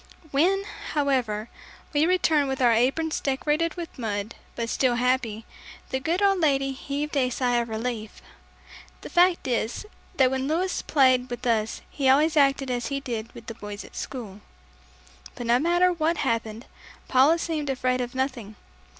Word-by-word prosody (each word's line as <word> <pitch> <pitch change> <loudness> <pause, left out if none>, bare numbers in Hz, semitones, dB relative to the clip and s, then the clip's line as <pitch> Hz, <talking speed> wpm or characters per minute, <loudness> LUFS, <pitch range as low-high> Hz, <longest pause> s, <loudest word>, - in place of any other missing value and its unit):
When, 370 +8 +2 0.3
however, 255 -7 0 0.5
we 300 +2 +3
returned 320 -5 +2
with 265 0 -3
our 245 -2 +5
aprons 270 +8 +1
decorated 300 +4 0
with 340 -6 -8
mud 210 -1 -3 0.2
but 235 -1 -2
still 245 +1 +1
happy, 245 -3 0 0.5
the 265 - 0
good 335 +8 0
old 390 -2 +4
lady 275 -4 +2
heaved 285 +3 -4
a 260 -3 +2
sigh 245 -1 0
of 235 -1 -1
relief. 220 -1 -4 0.8
The - - -9
fact 355 -2 +3
is, 240 - -1 0.3
that 260 -2 +4
when 265 0 -1
Louis 345 +5 0
played 255 -3 +3
with 245 +1 -6
us 225 -2 0
he 270 -3 0
always 300 +4 +4
acted 275 -2 +3
as 245 -1 -2
he 275 -1 -2
did 230 -4 -5
with 235 -1 -11
the 230 - -6
boys 205 -1 -8
at - - -15
school. 210 -6 -6 0.9
But 240 - -6
no 235 +1 +3
matter 350 +4 +3
what 330 0 0
happened, 230 -3 -2 0.4
Paula 270 +6 +5
seemed 315 -4 -3
afraid 255 -1 0
of 245 +1 -5
nothing. 255 -6 -3
265 Hz, 165 wpm, -25 LUFS, 235-300 Hz, 0.9 s, our